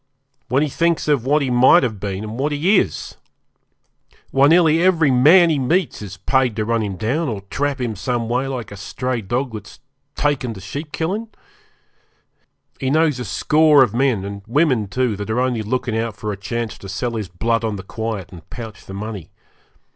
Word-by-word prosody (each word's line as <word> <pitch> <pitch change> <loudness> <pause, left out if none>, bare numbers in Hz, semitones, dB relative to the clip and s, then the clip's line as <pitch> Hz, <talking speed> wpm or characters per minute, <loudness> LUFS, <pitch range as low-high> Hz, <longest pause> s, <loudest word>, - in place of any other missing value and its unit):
When 135 +4 +2
he - - 0
thinks 165 +3 0
of 140 -5 +1
what 150 +1 +3
he 130 - -1
might 125 +2 +6
have 110 -5 -2
been, 100 0 -4
and 110 +3 -6
what 145 +2 0
he 175 +8 +3
is! - - -4 1.1
Why, 135 +1 +5
nearly 165 0 +4
every 170 -6 +3
man 165 +7 +6
he 150 - +1
meets 165 - 0
is 100 -2 -8
paid 125 +4 +1
to 110 -1 -1
run 115 0 0
him 100 -3 -3
down, 135 - -1
or 105 -4 -4
trap 145 -1 -1
him 120 -4 -2
some 115 +4 -2
way 125 +3 0
like 125 -6 -5
a 105 - -8
stray 125 +4 -3
dog 120 +5 -2
that's 105 -1 -9 0.4
taken 135 -6 -1
to - - -9
sheep 145 - -7
killin'. 195 +9 -2 1.5
He 130 - -1
knows 155 -2 +2
a 125 - -4
score 150 -2 +4
of 120 - -1
men, 120 -6 +1
and 100 0 -6
women 130 -4 +2
too, 125 +1 0
that 105 +1 -6
are 110 +3 0
only 125 -3 0
looking 120 +2 -2
out 115 -2 -2
for 105 0 -4
a - - -3
chance 115 +2 -4
to 95 - -9
sell 110 +6 -2
his 110 -5 -4
blood 115 +6 -1
on 110 -2 -1
the 95 - -7
quiet 110 -2 -5
and 85 -3 -13
pouch 110 -4 -9
the 95 - -7
money. 105 -4 -6
125 Hz, 200 wpm, -20 LUFS, 110-145 Hz, 1.5 s, might